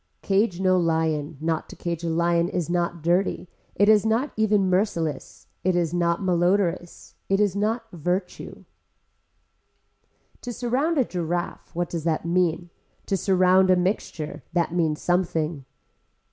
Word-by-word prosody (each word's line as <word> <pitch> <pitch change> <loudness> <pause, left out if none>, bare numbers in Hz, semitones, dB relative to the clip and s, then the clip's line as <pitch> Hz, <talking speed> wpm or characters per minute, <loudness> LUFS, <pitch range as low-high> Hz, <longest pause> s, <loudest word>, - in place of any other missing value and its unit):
Cage 195 -2 +1
no 185 -1 +3
lion, 160 -3 0
not 160 0 -2
to - - -10
cage 170 -1 -4
a 170 - -1
lion 170 +1 +1
is 175 -1 -2
not 170 -2 -1
dirty, 180 +2 +1 0.3
it 205 - +3
is 215 -1 +6
not 225 +6 0
even 210 -3 +2
merciless, 175 -6 -1 0.2
it 185 0 +2
is 170 -2 0
not 170 +1 0
malodorous, 175 -1 0 0.2
it 195 0 +2
is 205 -3 +2
not 220 +3 0
virtue. 180 +3 -4 1.8
To 245 - -5
surround 260 +8 0
a 265 - +3
giraffe, 175 -2 -4
what 175 0 -1
does 165 -3 -3
that 160 -1 0
mean. 175 -1 0 0.3
To 195 - 0
surround 185 0 +3
a 185 - +6
mixture, 180 -4 -2
that 170 -1 0
means 160 -3 0
something. 165 -5 -1
175 Hz, 145 wpm, -24 LUFS, 170-195 Hz, 1.8 s, is